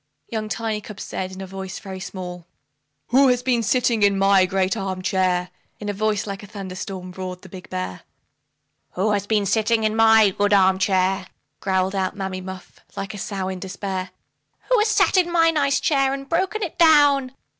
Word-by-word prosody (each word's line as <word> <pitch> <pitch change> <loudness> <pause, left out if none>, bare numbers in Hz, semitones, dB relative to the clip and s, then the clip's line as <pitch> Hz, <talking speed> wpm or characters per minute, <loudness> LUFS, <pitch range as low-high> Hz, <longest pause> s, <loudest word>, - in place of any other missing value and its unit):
Young 215 -2 -3
Tiny 220 -1 -2
cub 210 -1 -10
said, 185 -1 -5
in 190 +1 -8
a - - -5
voice 190 0 -7
very 190 -1 -8
small, 180 -2 -7 0.6
"WHO 270 +3 +5
HAS 250 -1 +2
BEEN 245 -2 +2
SITTING 230 +1 +1
IN 200 -1 +4
MY 195 -1 +4
GREAT 190 +1 0
ARM 190 -3 -4
CHAIR?" 185 -2 0 0.3
In 205 -1 -3
voice 210 0 0
like 195 -1 -6
a 205 - -11
thunder 195 -3 -7
storm, 185 -1 -6
roared 185 0 -7
the 190 - -12
big 185 0 -11
bear. 90 0 -4 0.9
"WHO 200 +4 0
HAS 205 -1 -1
BEEN 210 -2 +1
SITTING 220 +2 +1
IN 215 0 +1
MY 220 -2 +6
GOOD 205 +2 +1
ARM 190 -1 +4
CHAIR?" 190 0 +1 0.3
Growled 190 0 0
out 190 0 -1
Mammy 190 -1 -4
Muff, 185 0 -10 0.2
like 195 +2 -4
a 205 - -7
sow 195 -1 -3
in 190 -1 -4
despair. 190 0 -4 0.6
"WHO - - +5
HAS 425 - +3
SAT 430 -2 +3
IN 350 -2 +3
MY 330 -1 +4
NICE 280 -3 +1
CHAIR, 275 -3 +2
AND 275 0 -8
BROKEN 380 +5 0
IT 345 -1 -6
DOWN?" 290 -5 +5
200 Hz, 195 wpm, -22 LUFS, 190-230 Hz, 0.9 s, MY